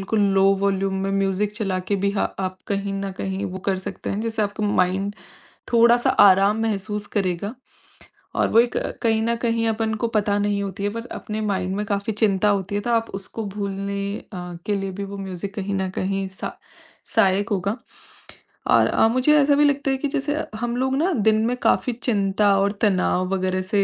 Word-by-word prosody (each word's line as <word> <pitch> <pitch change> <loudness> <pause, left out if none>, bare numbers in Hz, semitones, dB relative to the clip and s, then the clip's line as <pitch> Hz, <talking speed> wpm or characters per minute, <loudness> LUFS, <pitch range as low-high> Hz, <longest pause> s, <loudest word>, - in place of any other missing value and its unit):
Low 195 -2 +3 0.2
volume 195 -1 +1
में 195 - -1
music 195 +1 0
चलाकर 195 -2 -1
भी 200 - +2
ह - - +2
आप 185 -1 -3
कहीं 200 0 -2
न 195 0 -3
कहीं 195 +1 -2
वो 190 - -6
कर 190 - +1
सकते 195 0 -6
हैं 205 - -2
जिससे 225 -1 -2
आपका 205 +1 -2
माइंड 195 +1 +1 0.6
थोड़ा-सा 235 +1 +5 0.2
आराम 200 +3 +3
महसूस 210 -1 -2
करेगा 195 +3 -1 0.8
और - - +2
वो 230 - +7
कहीं 225 -1 0
न 235 +1 +1
कहीं 230 -1 +1
अपन 220 0 -1
को - - +3
पता 205 -1 +2
नहीं 205 0 0
होती 200 +1 -5
है - - +1
पर 230 +2 -6
अपने 215 0 -5
माइंड 190 -3 -1
में 210 +1 -2
काफ़ी 200 +2 -1
चिंता 210 -1 +2
होती 200 -1 -1
है 205 - 0
तो 240 - -2
आप 230 -1 +1
उसको 195 +3 -5
भूलने 200 -1 -3 0.4
अ, 180 -1 -6
के 210 - 0
लिए 195 0 -3
भी 200 +2 -5
वो 200 0 -7
म्यूजिक 195 0 -6
कहीं 200 -1 -2
न 190 -1 -1
कहीं 195 0 -1 0.2
स - - -1 0.7
सहायक 200 -2 +3
होगा। 200 +1 0 1.0
और - - +5
अ, - - +3
मुझे 255 +5 +3
ऐसा 285 0 +4
भी 295 +1 +4
लगता 280 -1 +1
है 265 - +1
कि 290 - -2
जैसे 285 +2 -1 0.2
हम 240 +1 -2
लोग 265 +1 0
ना 340 +6 +2 0.2
दिन 220 0 +4
में 245 - 0
काफ़ी 250 - +2
चिंता 200 -2 +2
और 200 +1 +2
तनाव 185 -3 +2
वगैरह 185 0 0
से 200 +2 +1
200 Hz, 195 wpm, -23 LUFS, 195-225 Hz, 1.0 s, वो